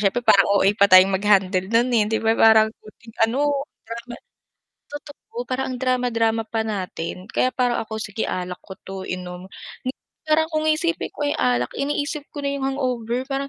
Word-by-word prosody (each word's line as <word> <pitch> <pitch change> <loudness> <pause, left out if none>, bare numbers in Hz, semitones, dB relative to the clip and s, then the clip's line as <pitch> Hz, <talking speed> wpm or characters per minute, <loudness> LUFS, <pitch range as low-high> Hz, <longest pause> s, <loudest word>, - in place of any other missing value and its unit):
siyempre 210 +4 +1
parang 195 -3 +6
OA 200 -1 +4
pa 200 - +6
tayong 185 +1 +8
mag-handle 190 -2 +2
nun 235 +2 +3
hindi 220 0 +2
ba 225 0 +3
parang 220 -1 +6
konting 225 +1 -16
ano, 280 +3 0 0.2
drama 235 +1 -7 0.7
totoo 300 +11 -8
parang 260 +1 -1
ang 250 - -6
drama-drama 230 -3 +1
pa 225 -1 -1
natin 185 -3 -5
kaya 255 - +1
parang 245 -2 +1
ako, 220 0 -6
"Sige 210 +1 -4
alak 180 0 -4
ko 190 - -10
'to 190 0 -8
inom," 180 0 -6 0.8
parang 315 +1 +4
kung 310 0 0
iisipin 330 +2 0
ko 290 - -3
yung 290 - 0
alak, 125 -1 +1
iniisip 290 +1 -2
ko - - -8
na 280 - -1
yung 280 - -5
hangover 250 -2 -2
parang, 275 0 -2
230 Hz, 175 wpm, -22 LUFS, 195-275 Hz, 0.8 s, tayong